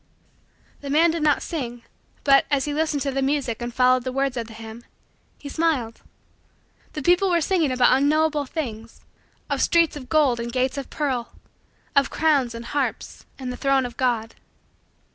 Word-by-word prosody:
The 280 - -7
man 320 +4 +4
did 330 0 -3
not 300 -1 +2
sing, 245 -7 -5 0.4
but, 275 -1 +5
as 280 -2 +1
he 295 - -3
listened 305 -2 0
to 280 - -1
the 270 0 -1
music 265 -4 -1
and 240 0 -4
followed 255 +1 +3
the 255 - -3
words 270 0 -1
of 235 -2 -4
the 225 - -11
hymn, 225 +1 -10 0.5
he 290 - -10
smiled. 280 -7 -1 0.9
The 300 - -5
people 360 +4 +3
were 345 -1 +3
singing 330 -3 +1
about 255 0 +4
unknowable 295 +1 +2
things 230 -7 -6 0.5
of - - -1
streets 335 -2 +3
of 260 -4 -9
gold 285 -6 +3
and 235 0 -4
gates 260 +2 0
of 275 - -8
pearl 260 -6 -2 0.6
of 280 -1 +4
crowns 280 -7 +1
and 230 0 -7
harps 285 +2 -3
and 260 -2 -5
the - - -8
throne 275 -2 +2
of 240 -1 -7
God. 235 -3 -1
275 Hz, 180 wpm, -23 LUFS, 245-300 Hz, 0.9 s, but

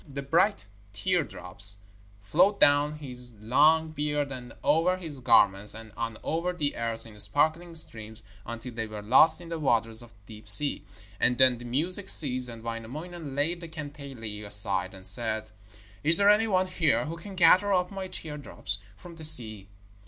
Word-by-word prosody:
The 140 0 -6
bright 170 - 0 0.3
teardrops 100 - -2 0.5
flowed 195 - +1
down 145 +1 +3
his 125 -5 -1
long 155 +8 +2
beard 150 -2 -3
and 125 -2 -9
over 165 +5 +1
his 160 -6 -6
garments, 100 -4 +3
and 110 -1 -12
on 115 -1 -5
over 170 +3 -3
the 150 -5 -3
earth 115 -1 -1
in 105 -2 -14
sparkling 155 - -1
streams, 110 -7 -2 0.2
until 115 +2 -9
they 115 -1 -5
were 105 -1 -9
lost 130 +10 +6
in 170 - -12
the 165 -1 -5
waters 115 -5 +1
of 120 - -7 0.2
the 105 -1 -12
deep 105 - -10
sea. 140 +8 +4 0.4
And 125 - +1
then 130 -2 +3
the 120 - -11
music 175 +11 0
ceased, 130 -4 +6
and 115 -1 -11
Wainamoinen 140 +7 -8
laid 165 +5 -2
the 170 - -8
kantele 140 -9 -9
aside 100 -2 +2
and 95 0 -11
said: 110 +2 0 0.5
'Is 160 +3 +5
there 200 0 +5
any 220 +2 +1
one 185 -3 +1
here 180 -5 -1
who 160 +2 -6
can 190 +4 -11
gather 185 +3 +4
up 180 -1 0
my 195 -1 -6
teardrops 150 - -5 0.2
from 170 +5 -14
the 160 - -10
sea?' 110 -10 +4
140 Hz, 175 wpm, -26 LUFS, 110-165 Hz, 0.5 s, lost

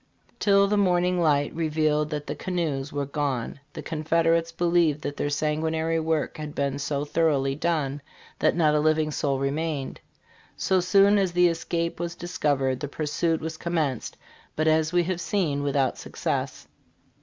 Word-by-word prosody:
"Till 200 -1 +4
the 210 +1 +1
morning 180 -2 +2
light 145 -3 +2
revealed 155 -2 0
that 150 -1 -4
the - - -3
canoes 155 -7 -3
were 145 -1 -2
gone 140 -3 -3
the - - -7
confed 165 +1 0
erates 165 0 +2
believed 170 -4 +2
that 145 0 -3
their 145 - -1
sanguinary 160 +2 0
work 160 -1 -1
had 150 -1 -6
been 140 0 -1
so 140 0 -2
thoroughly 145 -3 +1
done 145 -2 -1 0.4
that - - +2
not 155 -3 +3
a 150 - +3
living 155 0 +2
soul 140 -2 0
remained. 140 +1 -2 0.6
So 190 -1 +2
soon 200 +3 +4
as 190 -3 0
the 180 0 +5
escape 170 0 -2
was 170 0 -3
discovered, 145 -7 -1
the 145 - -4
pur 150 +2 -4
suit 160 +2 0
was 160 0 -5
commenced, 155 -8 -2 0.4
but 155 +1 0
as 155 0 +3
we 175 -1 +3
have 180 0 -2
seen, 160 -9 0
without 140 -2 0
success. - - -3
155 Hz, 165 wpm, -25 LUFS, 145-170 Hz, 0.6 s, the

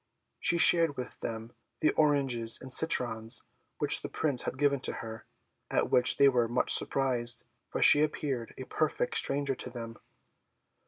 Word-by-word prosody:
She 170 - +1
shared 165 -3 +3
with 125 -1 -8
them 115 +1 -7 0.3
the 155 - +2
oranges 135 -7 0
and 130 -1 -5
citrons 115 -8 +1 0.3
which - - +4
the - - -7
Prince 140 -6 -1
had - - -6
given 140 0 +1
to - - -4
her; 110 -1 -9 0.4
at - - -1
which 125 0 +5
they 140 - +5
were 125 -3 +1
much 120 +2 +1
surprised, 125 -3 0 0.2
for - - -2
she 145 - +7
appeared 140 -6 -3
a 130 - -7
perfect 465 - -3
stranger 140 - -1
to 125 - -8
them. 115 -2 -9
130 Hz, 160 wpm, -29 LUFS, 120-145 Hz, 0.4 s, she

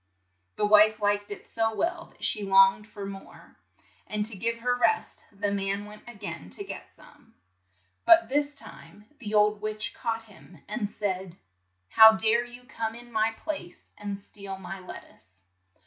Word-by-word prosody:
The 210 - +1
wife 210 +1 +6
liked 205 0 0
it 205 - -8
so 225 -1 -1
well 340 +3 -1
that - - -18
she 210 - 0
longed 195 +1 +5
for 205 -2 -8
more, 195 -1 -11 0.5
and 210 0 -2
to 220 -1 0
give 230 +4 0
her 245 +1 0
rest 435 - +1
the 200 0 -2
man 200 0 -1
went 210 0 -12
a 240 - -9
gain 170 - -7
to - - 0
get - - -8
some. - - -20 0.7
But 335 -6 +7
this 290 +3 0
time 210 -6 -11
the 215 -4 -3
old 210 0 +3
witch 215 0 -3
caught 225 -1 -3
him, 190 -4 -17
and 210 -1 -3
said, 190 -4 -4 0.5
"How 220 - +9
dare 220 +2 +2
you 245 +1 -12
come 225 -2 -4
in 240 0 -12
my 220 -1 +2
RAPUNZEL 225 - -6
51 - - -24 0.2
place 175 - -22
and 200 -1 -5
steal 200 -1 -9
my 190 +1 -7
lettuce?' 95 - -13
210 Hz, 180 wpm, -27 LUFS, 200-225 Hz, 0.7 s, How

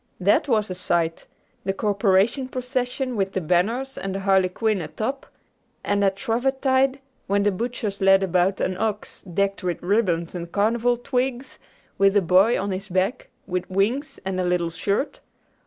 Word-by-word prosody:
That 195 +8 +3
was 215 -6 +1
a - - -1
sight! 170 -2 -1 0.4
the 195 - -1
corporation 205 +5 +1
procession 255 0 -2
with 195 -2 -1
the - - 0
banners 215 - 0
and 195 0 -4
the 195 - -3
harlequin 195 +2 +2
atop, 220 - -4 0.6
and 200 0 +1
at 195 -1 +2
Shrovetide, 265 +4 +1 0.3
when 200 +1 +2
the 205 - +3
butchers 215 -1 -4
led 195 0 +5
about 185 +1 +1
an 185 - -1
ox 215 -1 -2
decked 195 +2 -1
with 180 -2 -2
ribbons 175 -4 +1
and 170 -1 -6
carnival 235 +4 +2
twigs, 250 +1 -2 0.4
with 195 +1 +5
a - - +5
boy 190 +7 +4
on 200 +1 -2
his 195 +2 -5
back 190 +7 -1 0.2
with 180 -1 -3
wings 220 +10 0
and 190 -1 -2
a - - +1
little 175 -1 0
shirt.... 200 - -2
200 Hz, 160 wpm, -23 LUFS, 185-240 Hz, 0.6 s, led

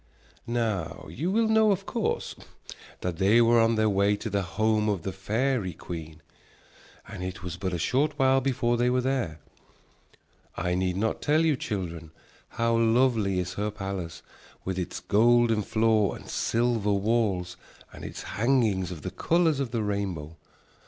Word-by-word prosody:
Now 110 -8 -2
you 150 - -2
will 220 +3 +2
know 220 0 +4
of 195 0 -1
course 230 -3 -2 0.7
that 90 -2 -3
they 100 +6 +4
were 115 0 +5
on 115 0 +3
their 110 0 +2
way 100 0 +2
to 110 +1 -6
the 100 0 +1
home 110 +3 +1
of 95 -5 -1
the 95 - -3
fairy 110 +1 -1
queen. 80 -2 -8 0.8
And 90 - -7
it 95 0 -6
was 90 -2 -4
but 95 +1 -3
a 90 - -2
short 145 - 0
while 135 0 +4
before 120 -2 0
they 120 +1 +2
were 125 0 +2
there. 125 - -1 1.2
I 90 - -1
need 90 0 0
not 110 +3 -1
tell 155 +2 +2
you, 155 -3 +3
children, 85 -9 -5 0.4
how 115 0 0
lovely 115 -4 +2
is 90 -1 -2
her 105 +2 -2
palace, 95 -4 -6 0.4
with 95 0 -2
its 90 - -4
golden 115 +1 +3
floor 110 -1 +2
and - - -12
silver 115 -3 0
walls 100 -4 0 0.4
and - - -10
its - - -7
hangings 110 -5 +1
of 85 -5 -8
the - - -4
colors 165 -4 +1
of 135 -3 -1
the 115 -2 -2
rainbow. 95 -7 -3
110 Hz, 165 wpm, -27 LUFS, 95-120 Hz, 1.2 s, were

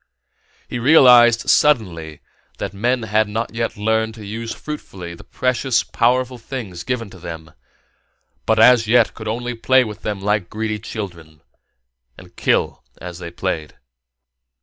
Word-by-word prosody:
He 120 - -4
realized, 120 -4 +6
suddenly, 90 - +1 0.4
that 100 - -5
men 120 +4 0
had 110 0 +1
not 115 +2 -3
yet 115 -1 -3
learned 110 +1 0
to 110 -2 -10
use 115 +3 -5
fruitfully 95 - -7
the 85 - -13
precious, 125 -1 0
powerful 125 +1 0
things 110 -8 -7
given 115 -3 -3
to 95 - -13
them, 80 -2 -8 1.0
but 110 - +3
as 115 0 +6
yet 120 0 +4
could 110 - -9
only 120 +3 -3
play 130 +3 +3
with 110 -2 -8
them 105 -2 -3
like 105 -2 -1
greedy 110 0 -3
children 85 -8 -8 0.7
and - - -15
kill - - 0 0.2
as 90 0 -8
they 85 -2 -7
played. 85 -3 -4
110 Hz, 145 wpm, -20 LUFS, 95-120 Hz, 1.0 s, realized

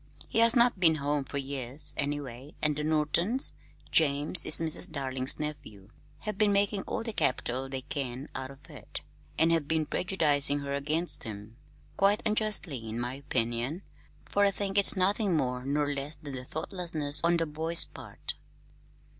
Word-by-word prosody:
He - - -1
has 230 +2 +6
not 240 -4 +3
been 165 -3 +4
home 145 -1 -2
for 140 - -6
years, 135 0 +3
anyway, 140 -1 -5
and 150 -1 0
the 150 - -4
Nortons 160 - +3 0.4
James 150 +2 +2
is - - +5
Mrs. 160 -1 +1
Darling's 130 -2 0
nephew 145 -10 -8 0.3
have 215 -2 -6
been 210 -1 +3
making 200 0 +1
all - - -4
the 225 -1 -5
capital 130 -4 -1
they 135 -1 -5
can 130 0 -5
out 130 0 -6
of 135 +1 -15
it, - - -10 0.4
and 165 +1 +3
have 165 -4 0
been 160 0 0
prejudicing 145 -4 0
her 140 0 -5
against 155 +5 -1
him 105 0 -9 0.4
quite 200 +2 +2
unjustly, 210 -8 -2
in 110 +2 -5
my 120 +1 -4
opinion, 130 +4 -3 0.4
for 205 - 0
I 200 - +5
think 200 0 -1
it's 200 - +7
nothing 195 -1 +1
more 125 -3 -2
nor 145 0 0
less 140 +2 -5
than 135 -4 -8
thoughtlessness 160 -2 +1
on 170 0 +3
the 165 - -1
boy's 160 +2 +3
part." - - -6
150 Hz, 165 wpm, -28 LUFS, 135-180 Hz, 0.4 s, it's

